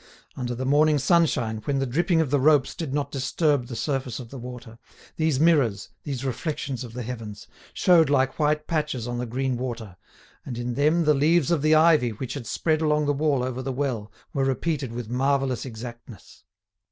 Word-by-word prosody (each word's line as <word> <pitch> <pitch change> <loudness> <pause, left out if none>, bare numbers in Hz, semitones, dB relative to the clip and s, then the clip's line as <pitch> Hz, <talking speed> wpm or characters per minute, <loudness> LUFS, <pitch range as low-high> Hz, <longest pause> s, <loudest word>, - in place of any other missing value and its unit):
Under 120 -1 -3
the 130 +2 -4
morning 150 +2 +4
sunshine, 140 -8 +2
when 140 -1 0
the 135 - 0
dripping 165 +6 +1
of 145 -5 -2
the 145 - +3
ropes 145 -1 +4
did 160 -5 -5
not 145 0 -2
disturb 140 -1 0
the 120 - -6
surface 130 0 -2
of 120 -3 -9
the 135 - -7
water, 120 -2 -9 0.4
these 155 -4 +1
mirrors, 140 - +2
these 135 -3 -5
reflections 135 -1 -3
of 120 -2 -9
the 125 0 -5
heavens, 110 -4 -7 0.3
showed 170 -5 +4
like 135 0 +1
white 150 0 +1
patches 150 -7 -2
on 120 0 -3
the 125 - -3
green 130 +2 -1
water, 115 -7 -5 0.5
and 125 -3 -6
in 120 0 -3
them 155 +6 +2
the 150 - +5
leaves 155 +3 +3
of 165 -4 +2
the 155 +1 +4
ivy 155 -5 +5
which 125 +4 -5
had 130 -6 -6
spread 155 +5 0
along 150 -1 +2
the 145 - +2
wall 145 -3 +1
over 130 0 -3
the 135 - -3
well 125 -6 -3 0.2
were 135 - 0
repeated 135 0 -1
with 120 -1 -5
marvellous 135 +1 0
exactness. 120 -3 -10
135 Hz, 195 wpm, -25 LUFS, 120-150 Hz, 0.5 s, the